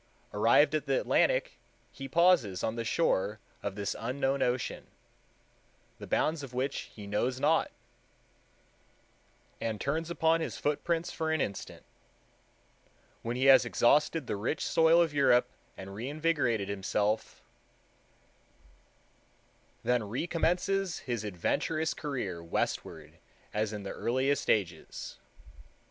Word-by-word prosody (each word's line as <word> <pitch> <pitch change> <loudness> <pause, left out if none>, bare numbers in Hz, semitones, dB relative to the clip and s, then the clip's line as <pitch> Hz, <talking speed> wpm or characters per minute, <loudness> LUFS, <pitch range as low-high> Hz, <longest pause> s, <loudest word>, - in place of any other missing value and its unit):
Arrived - - +4
at - - -1
the - - +2
Atlantic, - - +1 0.3
he 135 - -7
pauses 170 - +3
on 110 - -1
the 115 - -3
shore 110 - +1 0.2
of 100 -1 -4
this 100 -1 -3
unknown 135 +3 -1
ocean, 125 0 -1 1.1
the - - -8
bounds 155 0 +1
of 130 -3 -9
which 135 +2 -2
he 105 - -9
knows 120 +6 -1
not, - - +2 1.9
and 110 -2 -2
turns 160 +7 -2
upon 165 -1 +2
his - - -4
footprints 165 +3 -1
for 160 -1 -2
an 160 - +1
instant." 100 -7 -4 1.4
When 115 +1 -3
he 130 +2 0
has 135 -1 +8
exhausted 150 +7 +2
the - - -3
rich 115 +9 -2
soil 165 +1 +5
of 160 -3 -3
Europe, 125 -3 +4 0.3
and 95 +1 -8
reinvigorated 130 -3 0
himself, 100 +2 -1 2.4
"then 125 -2 +2
recommences 175 - 0
his 120 -4 -2
adventurous 155 - -1
career 110 - -4
westward 80 -1 -3 0.3
as 105 0 0
in 105 -2 -6
the 100 - -5
earliest 135 +3 0
ages." 90 -7 -2
125 Hz, 120 wpm, -30 LUFS, 105-160 Hz, 2.4 s, has